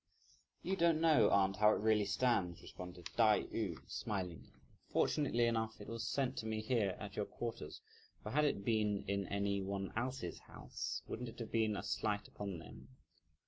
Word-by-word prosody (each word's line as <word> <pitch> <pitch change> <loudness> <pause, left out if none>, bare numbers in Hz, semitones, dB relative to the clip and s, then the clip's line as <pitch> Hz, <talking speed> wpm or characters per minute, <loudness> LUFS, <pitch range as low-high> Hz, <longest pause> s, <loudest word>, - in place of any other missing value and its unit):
"You 190 - 0
don't 170 -3 +4
know, 160 -2 +5
aunt, 95 0 +3
how 105 +1 +6
it - - 0
really 105 -1 +3
stands," 100 -5 +1
responded 90 -1 -8
Tai 110 -3 +5
yü - - -3
smilingly; 90 -5 -4 0.4
"fortunately 130 -6 +2
enough, 110 -1 0
it 105 - -9
was 115 +1 -3
sent 135 -2 0
to 110 - -4
me 110 0 -1
here 110 -4 +1
at 100 -1 -7
your 105 - -1
quarters; 115 -10 -5 0.4
for - - -5
had 150 +3 +3
it 100 -9 0
been 105 -3 +2
in 100 -1 0
any 100 0 0
one 95 0 -3
else's 120 -5 -2
house, - - -5
wouldn't 120 +1 -4
it - - -12
have 115 -2 -6
been 110 -2 +2
a 95 - -4
slight 105 -1 -1
upon 100 -3 -5
them? 65 -5 -11
105 Hz, 180 wpm, -37 LUFS, 100-115 Hz, 0.4 s, how